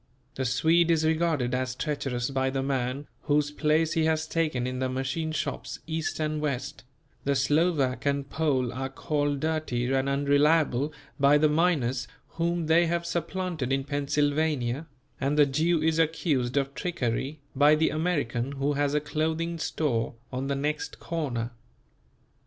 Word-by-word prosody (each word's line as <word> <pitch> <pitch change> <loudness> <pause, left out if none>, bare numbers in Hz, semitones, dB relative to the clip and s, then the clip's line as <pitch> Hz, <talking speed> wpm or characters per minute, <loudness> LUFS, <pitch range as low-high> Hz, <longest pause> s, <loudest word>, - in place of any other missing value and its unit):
The 130 - -3
Swede 165 +7 +3
is 160 -1 +3
regarded 160 -6 +1
as 125 0 -1
treacherous 135 -4 -2
by 130 -1 +1
the 135 0 -1
man 135 +1 -1 0.2
whose 145 0 +2
place 155 +2 +2
he 165 -2 +2
has 160 0 +1
taken 155 -7 0
in 130 0 -3
the 130 0 0
machine 135 +5 -2
shops 155 - -3
East 160 0 -3
and 155 -1 -1
West; 140 -4 -3 0.4
the 140 0 +1
Slovak 145 -1 +2
and 140 -1 0
Pole 135 -6 0
are 135 +2 -3
called 145 0 -1
dirty 155 -6 -1
and 135 +1 +1
unreliable 145 0 +3 0.3
by 140 +1 +6
the 155 +1 +4
miners 150 -6 +1 0.2
whom 170 +1 -1
they 165 +2 +4
have 170 +1 -1
supplanted 170 -4 -2
in 135 0 +1
Pennsylvania, 145 -1 0 0.3
and 140 +2 0
the 150 - +7
Jew 155 +4 +1
is 160 0 +2
accused 150 -5 +1
of 140 0 0
trickery 135 -1 -2 0.2
by 145 +3 +6
the 160 +1 +2
American 145 -6 -1
who 140 +1 0
has 145 0 0
a - - +4
clothing 160 +3 -2
store 120 -9 -1 0.2
on 130 +2 -2
the 140 - 0
next 150 +2 -3
corner. 130 -8 -3
145 Hz, 155 wpm, -27 LUFS, 135-160 Hz, 0.4 s, the